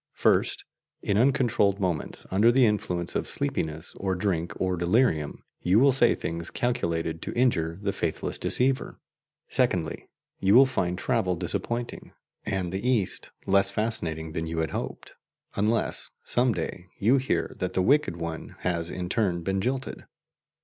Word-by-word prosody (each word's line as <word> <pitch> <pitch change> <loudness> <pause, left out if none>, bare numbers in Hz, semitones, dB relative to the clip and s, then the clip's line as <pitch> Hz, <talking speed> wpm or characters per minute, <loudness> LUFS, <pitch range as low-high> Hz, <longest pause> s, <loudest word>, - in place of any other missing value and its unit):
First, - - +2 0.4
in 100 - +1
uncontrolled 115 -5 +3
moments, 90 -5 -2
under 105 +5 +5
the 130 0 +5
influence 90 -5 -1
of - - -1
sleepiness 80 +1 -2
or 95 -1 -1
drink 90 -3 -1
or 95 -1 +1
delirium, 85 - +1 0.2
you 95 +4 +4
will 140 +2 +6
say 120 -2 +4
things 85 +1 -4
calculated 85 -9 -1
to - - -5
injure 85 -10 +1
the 100 -1 0
faithless 80 -2 -2
deceiver. 130 +1 +1 0.5
Secondly, 90 -11 0 0.3
you 95 +2 +4
will 135 +2 +9
find 95 -9 -1
travel 95 -2 0
disappointing, 120 +7 -4 0.3
and 95 -3 -2
the 95 +3 -3
East 110 -8 0 0.2
less 100 0 +4
fascinating 85 -7 -2
than 80 0 -3
you 80 0 -4
had 80 -1 0
hoped - - -5 0.4
unless, 110 +3 0
some 125 0 +2
day, 90 -1 -4
you 120 +7 +4
hear 130 0 -1
that 90 0 -2
the 95 - +2
wicked 140 - +3
one 85 -1 -6
has 85 -2 -1
in 90 -1 -4
turn 90 -4 0
been 95 +2 0
jilted. 130 +4 -3
95 Hz, 150 wpm, -27 LUFS, 85-120 Hz, 0.5 s, will